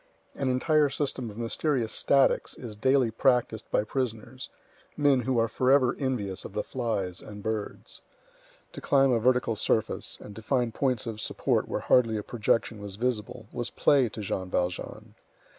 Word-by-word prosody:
An 135 - -2
entire 150 +3 +3
system 135 -4 -2
of 105 - -11
mysterious 120 +1 -1
statics 140 -1 +2
is 115 -4 -7
daily 130 +2 +2
practised 115 -1 +1
by - - +2
prisoners, 125 +1 -4 0.5
men 145 -3 +4
who 125 +1 0
are 115 0 +3
forever 130 +1 +3
envious 110 -9 -2
of - - -9
the 105 - -1
flies 105 -8 -3
and 105 -1 -10
birds. 110 -1 -5 0.7
To - - -8
climb 135 -1 +3
a 120 - +3
vertical 125 -1 +2
surface, 110 +1 -1
and 105 - -11
to 110 - -8
find 120 -1 0
points 130 -3 0
of 110 -2 -5
support - - 0
where - - -3
hardly 115 -3 +3
a 105 - -4
projection 115 -1 0
was 100 -2 -7
visible, 115 0 -3
was 120 -1 -3
play 135 -5 +3
to 110 - -7
Jean 95 -2 -3
Valjean. 90 0 -3
120 Hz, 165 wpm, -28 LUFS, 110-130 Hz, 0.7 s, men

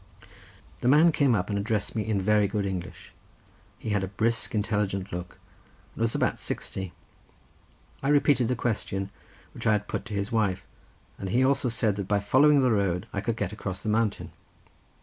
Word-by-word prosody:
The - - -1
man 155 +6 +6
came 140 -6 +3
up 100 +1 -1
and 100 - 0
addressed 105 +1 -1
me 110 - 0
in 105 -2 0
very 105 +1 +3
good 105 0 -2
English: 90 -3 -6 0.6
he 110 - -5
had 105 -2 +1
a - - -2
brisk, 115 +4 0
intelligent 105 -2 -1
look, 90 0 -6 0.6
and - - -8
was 115 0 +1
about - - 0
sixty. 95 -2 -4 1.1
I 135 - -2
repeated 145 -4 +4
the 125 - 0
question 100 -5 -2 0.4
which - - -4
I 110 - +5
had 105 0 -1
put - - -4
to 105 - -5
his 100 +1 -2
wife, 100 -5 0 0.5
and 95 - -4
he 125 +6 +3
also 135 -2 +2
said 110 -3 0
that 100 -2 -3
by 105 0 +2
following 140 +7 +5
the 130 -2 +3
road 95 -4 +1
I 100 - -1
could 115 +2 -1
get 100 -2 -2
across 95 -3 -5
the 110 - -2
mountain. 110 -1 0
105 Hz, 190 wpm, -27 LUFS, 100-115 Hz, 1.1 s, man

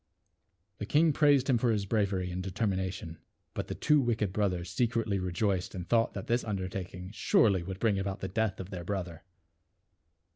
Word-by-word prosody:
The 100 - -4
king 155 +1 +4
praised 145 -3 +4
him 125 -4 +3
for 120 - +2
his 105 -3 +1
bravery 100 -4 0
and 90 +1 -3
de 95 - -4
termination 95 -3 -2
j 80 - -12 0.3
but - - -4
the - - -4
two 150 -2 +3
wicked 110 -6 0
brothers 90 -4 -1
secretly 115 -5 0
rejoiced 95 +2 -1
and 90 -1 -5
thought 115 -1 +2
that - - -5
this 120 +1 +1
undertak 95 -3 -4
ing 90 +1 -8
surely 105 -3 +3
would 95 +2 -6
bring 105 -3 +2
about 95 0 -3
the 95 - -3
death 110 +1 -1
of 95 +1 -7
their 90 -3 -5
brother. 90 -3 -4
100 Hz, 190 wpm, -30 LUFS, 95-115 Hz, 0.3 s, king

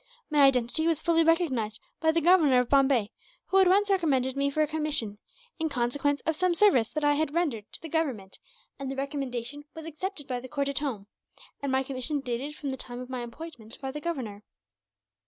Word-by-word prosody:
My 300 - +3
identity 270 +4 +2
was 330 -3 +2
fully 330 0 +3
recognized 265 -10 +1 0.2
by 320 0 +3
the 330 +1 +1
Governor 320 -6 +5
of 250 -1 0
Bombay, 265 -6 +3 0.4
who 385 - +4
at 380 - +6
once 400 +3 +4
recommended 275 -9 +1
me 280 0 +1
for 310 +2 +1
a - - 0
commission, 295 -9 -2 0.4
in 320 0 0
consequence 280 +3 0
of 320 - -1
some 365 +1 +1
service 295 - +4
that 305 0 -3
I 290 0 +4
had 305 +1 -1
rendered 275 -12 -1
to - - -9
the - - -5
Government; 270 - -2 0.4
and 275 -1 -4
the 270 - -4
recommendation 275 -1 -4
was 320 -1 -8
accepted 325 0 -5
by 250 -2 -2
the 255 +1 -10
court 280 0 -1
at 280 - -1
home, 250 -9 -3 0.6
and 280 -1 -2
my 265 0 +2
commission 270 +2 -2
dated 270 +3 -4
from 280 -3 -4
the 265 - -4
time 245 -1 -7
of 250 +1 -8
my 255 -1 -3
appointment 240 -2 -9
by 270 -1 -4
the 300 +2 -6
Governor." 255 -12 -4
280 Hz, 210 wpm, -28 LUFS, 250-320 Hz, 0.6 s, at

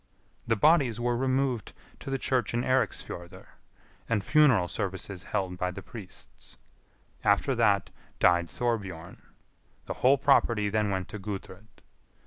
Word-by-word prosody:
The 115 - +3
bodies 130 -2 +3
were 120 0 0
removed 130 -2 0 0.3
to - - -8
the 135 - 0
church 130 -2 -1
in 120 - 0
Eiriksfjordr, 125 -9 -2 0.6
and 105 -4 +1
funeral 135 - +4
services 95 -1 -4
held 95 -3 -3
by 90 - 0
the 95 +1 -8
priests. 100 -1 -11 0.7
After - - +3
that - - +2 0.3
died 85 -1 +3
Thorbjorn. 95 -9 -3 0.6
The - - -4
whole 135 +3 +5
property 115 -6 +3
then 105 0 0
went 95 -2 -2
to 105 - -7
Gudrid. 100 0 -8
105 Hz, 130 wpm, -28 LUFS, 95-125 Hz, 0.7 s, whole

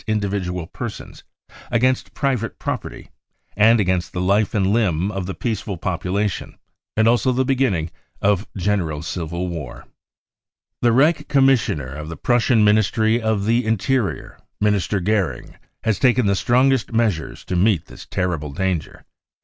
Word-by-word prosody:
individual 100 -5 -2
persons, - - -8 0.5
against 125 +2 +1
private 125 -5 -1
property, - - -5 0.4
and 110 +3 +5
against 95 -3 0
the 90 - -3
life 100 +4 +1
and 100 -3 +2
limb 100 -4 +1
of 95 -3 -4
the 95 - -3
peaceful 110 -4 -3
population, 95 +3 -2 0.4
and 110 +1 +4
also 120 +2 +3
the 130 +1 +1
beginning 125 -12 0 0.3
of 100 0 +1
general 90 -6 -1
civil 85 +1 -4
war. 80 -7 -7 0.5
" - - -67
The 120 - +4
Reich 150 +4 +3
Commissioner 130 - +2
of 75 +2 -7
the 80 - -7
Prussian 120 -2 +3
Ministry 110 +2 +3
of 110 -3 0
the 115 +3 +2
Interior, 110 +1 -1 0.2
Minister 105 -1 +1
Goering, 95 - -1 0.3
has 110 -3 0
taken 125 -2 +3
the 100 - +3
strongest 125 +4 +2
measures 110 -8 -1
to 90 - -3
meet 90 -2 +2
this - - -13
terrible 85 -5 -2
danger. 90 +1 -3
105 Hz, 140 wpm, -21 LUFS, 90-115 Hz, 0.5 s, and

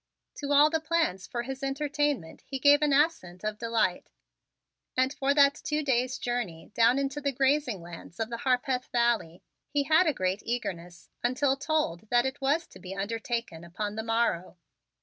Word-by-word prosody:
To 285 -1 -4
all 290 +2 +6
the 320 - +1
plans 320 - 0
for 240 -1 -3
his 265 +1 -6
entertainment 280 - -1
he 270 - -3
gave 285 +2 +5
an 300 -1 +2
assent 275 - +1
of 215 0 -3
delight 230 -6 0 0.9
and 260 +2 +2
for 275 -1 0
that 280 -1 +6
two 300 0 -1
days' 255 -2 +1
journey 235 -10 -4
down 235 +3 +4
into 275 +1 -2
the 280 0 0
grazing 265 - +1
lands 170 0 -11
of 225 +1 -2
the 235 - -3
Harpeth 255 0 0
Valley 235 -8 0 0.3
he 285 0 +1
had 320 +5 +4
a 305 - +3
great 185 +2 -1
eagerness 175 -7 -5
until 265 +3 +2
told 275 - -1
that 240 0 +3
it 265 +2 -3
was 295 +5 +1
to - - -14
be 190 0 -7
undertaken 225 -3 -3
upon 205 +5 -4
the 220 - -3
morrow. 225 -6 -1
250 Hz, 175 wpm, -28 LUFS, 215-285 Hz, 0.9 s, all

